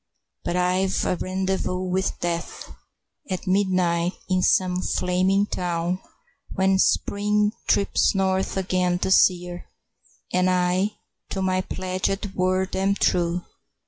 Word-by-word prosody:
But 175 - -2
I've 180 +1 +1
a - - +1
rendezvous 185 0 -2
with 185 +1 -1
Death 170 -1 -4 0.6
At 185 +1 -3
midnight 185 -2 +1
in 185 -1 +1
some 180 0 +2
flaming 185 +3 +1
town, 175 -1 -2 0.6
When 190 0 +2
Spring 210 +2 +2 0.2
trips 200 0 +2
north 190 0 0
again 180 -1 +1
this 190 +1 +5
year, 180 -1 -9 0.6
And 185 0 +3
I 185 +3 +1 0.4
to 190 - -2
my 185 0 +1
pledged 185 +2 -3
word 185 0 0
am 195 +1 +1
true. 175 -2 0
185 Hz, 115 wpm, -24 LUFS, 180-190 Hz, 0.6 s, this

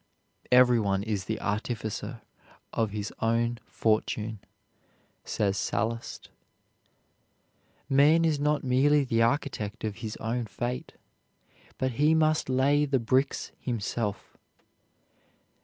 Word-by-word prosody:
"Every 125 -1 +6
one 100 -2 0
is 105 -3 -2
the 110 0 -3
artificer 110 +1 -3 0.5
of 115 -2 0
his 105 0 -5
own 115 +1 +1
fortune," 110 0 -1 0.8
says 100 -1 -1
Sallust. 115 +4 -3 1.6
Man 150 +5 +5
is 155 -3 +1
not 150 +1 +1
merely 140 +3 +3
the 115 -3 +1
architect 115 -4 -1
of 105 -1 -3
his 110 -1 -6
own 115 +1 -2
fate, 120 +5 -4 0.8
but 130 0 0
he 155 +2 +5
must 155 -3 +2
lay 140 +3 +3
the 140 -2 +1
bricks 130 +4 0
himself. 115 -3 -3
120 Hz, 105 wpm, -28 LUFS, 110-135 Hz, 1.6 s, Every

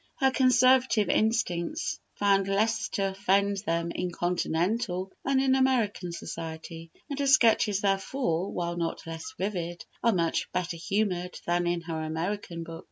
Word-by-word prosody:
Her 265 -1 +3
Conservative 255 -4 +4
instincts 220 - 0 0.2
found 195 -1 +2
less 220 +3 +1
to 195 -1 +1
offend 200 +1 +1
them 170 0 0
in 180 +1 -2
Continental 180 +3 -1
than 275 -1 +2
in 265 -1 +3
American 240 -9 +1
society, 165 0 -7 0.2
and 285 -2 -5
her 280 - +1
sketches, 225 -7 +4
therefore, 195 -2 0
while 175 0 -3
not 170 -1 -3
less 165 0 -7
vivid, 175 -3 -3 0.2
are 235 - +5
much 170 -5 0
better 180 -1 -1
humoured 180 0 -1
than 175 0 +1
in 175 0 0
her 165 -1 -4
American 170 +2 -3
book. 165 0 -8
190 Hz, 145 wpm, -28 LUFS, 170-225 Hz, 0.2 s, are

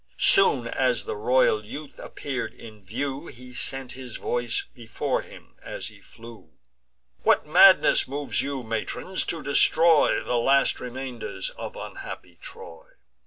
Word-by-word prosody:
Soon 390 - +6
as - - 0
the 450 - -5
royal 480 0 +2
youth 150 -1 -10
appear'd 135 -3 -5
in 110 -3 -13
view, 135 - -4
He 125 +1 -12
sent 135 0 -3
his 130 -3 -8
voice 120 -1 -2
before 115 -2 -3
him - - -15
as - - -7
he - - -18
flew: 115 -8 -14 0.7
"What - - +3
madness 185 +5 +6
moves 140 +2 -2
you, 140 -2 -4
matrons, 115 +11 -3
to 165 -3 -4
destroy 155 +3 +4
The 125 - -1
last 135 +3 +2
remainders 125 -6 -6
of - - -8
unhappy 85 -2 -9
Troy! 85 -2 -12
135 Hz, 135 wpm, -25 LUFS, 115-150 Hz, 0.7 s, Soon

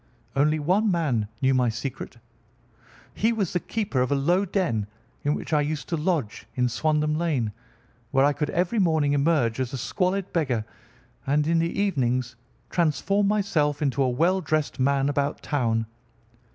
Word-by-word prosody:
Only 150 +3 +3
one 185 +8 +2
man 145 - 0 0.2
knew 135 0 +4
my 125 -2 +3
secret. 125 +3 -5 1.0
He 225 +3 +1
was 210 -6 -1
the 180 - +1
keeper 205 - -2
of 130 - 0
a - - +3
low 175 +8 +2
den 125 - -1 0.4
in 145 +1 +1
which - - -5
I 150 - +4
used 150 0 -3
to 170 - 0
lodge 155 - -2
in 125 -1 +1
Swandam 150 +3 0
Lane, 140 -11 0 0.6
where 135 +2 +3
I 145 - +3
could 150 0 -2
every 180 +6 0
morning 160 -6 +2
emerge 140 -5 +2
as 130 0 -2
a - - -2
squalid 185 - -1
beggar 130 -10 0 0.6
and 145 +2 +2
in 165 +1 +2
the 165 +3 -1
evenings 130 - 0 0.4
transform 195 +5 +1
myself 165 -9 +1
into 140 -3 0
a 130 - +3
well 170 +9 +2
dressed 155 -3 -1
man 135 +1 +2
about 145 0 -1
town. 115 -6 0
150 Hz, 165 wpm, -25 LUFS, 130-170 Hz, 1.0 s, knew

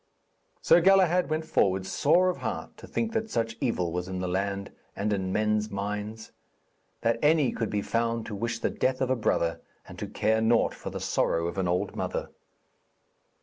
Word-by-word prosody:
Sir 175 - +6
Galahad 180 -2 +4
went 155 +1 -1
forward, 95 -10 +1
sore 165 - +3
of - - -8
heart - - -5
to - - -11
think 225 -1 -2
that 225 -1 -1
such 115 - -1
evil 90 -10 0
was 90 +1 -3
in 95 -1 -4
the 90 - -2
land 100 +2 -2 0.2
and 105 +1 -1
in 95 -2 -2
men's 105 +1 +1
minds, 105 +2 -4 0.7
that 115 0 +1
any 150 -3 +4
could 115 -3 -2
be 105 -1 -1
found 115 0 -1
to 110 - -6
wish 115 +3 -2
the - - -1
death 130 0 0
of 130 -1 0
a - - +3
brother 85 -7 0 0.3
and - - -10
to - - -4
care 110 +1 +1
naught 115 +1 +3
for - - -7
the - - -5
sorrow 85 0 0
of 85 +3 -3
an 95 - 0
old 90 +1 -1
mother. - - -3
110 Hz, 190 wpm, -28 LUFS, 100-130 Hz, 0.7 s, Sir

